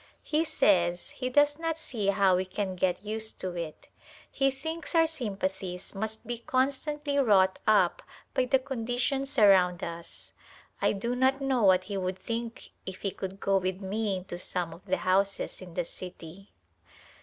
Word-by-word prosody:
He 310 +1 +1
says 180 - +2
he 255 -1 -3
does 290 +3 +3
not 330 -1 -1
see 235 -10 -3
how 195 -2 +4
we 185 - 0
can 190 0 -3
get 180 +2 0
used 220 +1 -3
to 185 -1 -3
it 165 -3 -6 0.2
\ - - -20
he 270 0 +2
thinks 320 +6 -4
our 325 0 +6
sympathies 195 - -3
must 220 +2 -4
be 240 -1 -4
constantly 280 +3 0
wrought 190 -7 +4
up 215 - +4 0.3
by 255 - +2
the 265 +2 +4
conditions 265 +2 -2
around 185 -5 +5
us. 170 0 -6 0.5
I - - +3
do 235 +5 -2
not 260 +2 +3
know 270 -3 +1
what 185 -3 +5
he 200 +1 -4
would 185 0 -2
think 230 +2 -5
if 185 0 -7
he 195 - 0
could 195 +1 -6
go 195 0 +2
with 185 0 -1
me 200 0 -1
into 180 -1 -7
some 175 -2 -2
of 170 - -14
the 185 -1 +1
houses 195 +2 +1
in 175 -2 -10
the 175 - 0
city. 180 +2 -10
205 Hz, 175 wpm, -29 LUFS, 185-260 Hz, 0.5 s, our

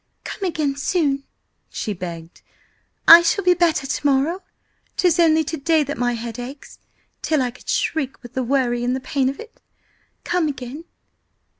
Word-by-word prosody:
"Come 395 - -5
again 295 -5 -1
soon!" 280 -3 0 0.4
she 210 - -4
begged. 170 -3 -8 0.7
"I 335 +1 +11
shall 365 +4 +1
be 360 0 +5
better 335 -5 +1
to 270 - -3
morrow! 285 +7 +1 0.6
'Tis 355 -1 +2
only 320 -1 +4
to 320 +2 -4
day 310 +2 +2
that 290 +1 -4
my 245 0 0
head 230 0 -6
aches 265 +3 -9 0.4
till 310 -2 +1
I 250 -2 0
could 250 - -14
shriek 280 -5 -1
with 240 0 -11
the 260 - -1
worry 245 -2 0
and 250 +1 0
the - - -2
pain 265 0 0
of 275 - -6
it! 455 +1 -12 0.6
Come 350 -3 0
again!" 275 +3 -6
275 Hz, 170 wpm, -21 LUFS, 250-325 Hz, 0.7 s, I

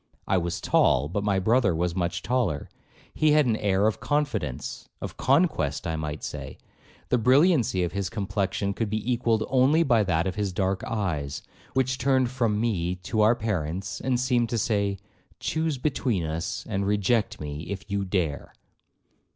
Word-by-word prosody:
I 95 -1 +3
was 85 0 -3
tall, 70 +3 +3
but 100 +4 -2
my 100 -2 +1
brother 105 -1 +3
was 85 +1 0
much 85 -2 -2
taller; 125 -4 -1 0.4
he 155 -1 +3
had 150 -1 +5
an 115 -3 +2
air 100 -1 +1
of 110 - +1
confidence, 105 - -2
of - - -6
conquest 130 - +1
I 80 -1 -1
might 75 -1 -4
say; 70 -3 -6 0.5
the 125 - +3
brilliancy 130 - +4
of 85 - -1
his 100 -1 -2
complexion 100 -1 -2
could 110 +1 -2
be 110 +3 -1
equalled 115 -2 +1
only 135 +5 +4
by 120 -7 +3
that 85 -3 +1
of 95 - -1
his 100 -2 -2
dark 95 0 -1
eyes, 80 -11 -2 0.3
which 130 0 +1
turned 130 -1 +2
from 115 -5 0
me 90 -6 0
to 110 +4 0
our 110 +3 +5
parents, 95 -4 -3
and 130 -2 0
seemed 125 -2 +1
to 115 - -1
say, 100 -2 0 0.4
'Chuse 160 -2 -1
between 125 - 0
us, 80 +4 -3
and 100 -2 -1
reject 105 +3 +1
me 75 +1 -6
if 100 +1 -6
you 100 0 0
dare.' 90 -6 -2
105 Hz, 170 wpm, -26 LUFS, 90-125 Hz, 0.5 s, had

